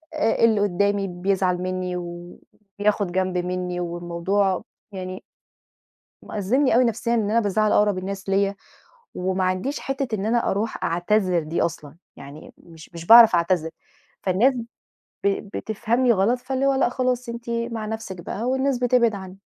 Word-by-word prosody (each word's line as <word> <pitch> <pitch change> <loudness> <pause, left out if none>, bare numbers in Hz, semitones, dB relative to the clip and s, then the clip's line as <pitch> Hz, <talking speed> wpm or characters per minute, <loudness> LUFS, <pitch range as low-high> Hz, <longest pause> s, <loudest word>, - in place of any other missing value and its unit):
آآ 225 +1 +1
اللي 220 -3 +3
قُدّامي 200 +1 +1
بيزعَل 185 0 0
مني 185 -1 -3
و 175 0 -8 0.4
بياخد 205 -2 +1
جنب 185 0 -1
منّي 180 0 -3
والموضوع 175 +3 -1 0.3
يعني 185 0 -6 1.0
مأزّمني 230 +7 +1
أوي 250 - +5
نفسيًا 235 0 0
إن 220 -3 +1
أنا 230 - +4
بازَعّل 215 0 +1
أقرَب 205 -2 +3
الناس 195 +1 -5
ليَّ 200 +1 +1 0.6
وما 185 +1 -1
عنديش 185 +10 -1
حِتّة 270 -4 -3
إن 200 -1 -4
أنا 235 +2 +1
أرُوح 215 +3 -3
أعتذر 180 +1 +1
دي 155 +2 -2
أصلًا، 155 -3 -3 0.2
يعني 140 +3 -12
مش 165 -2 -15
مش 170 0 -8
باعرَف 230 -1 +9
أعتذر، 170 -1 +1 0.5
فالناس 200 +9 +3 0.7
ب - - +5 0.3
بتفهَمني 235 +3 +1
غلط، 220 +4 +2
فاللي 265 +2 -2
هو 275 - +3
لأ، 265 - +2
خلاص 250 0 -1
أنتِ 235 0 -6
مع 230 -1 -3
نفسِك 220 -4 -6
بقى 190 +5 -6
والناس 265 +1 0
بتبعِد 245 -2 +3
عنّي. 190 -1 -9
200 Hz, 150 wpm, -23 LUFS, 180-235 Hz, 1.0 s, باعرَف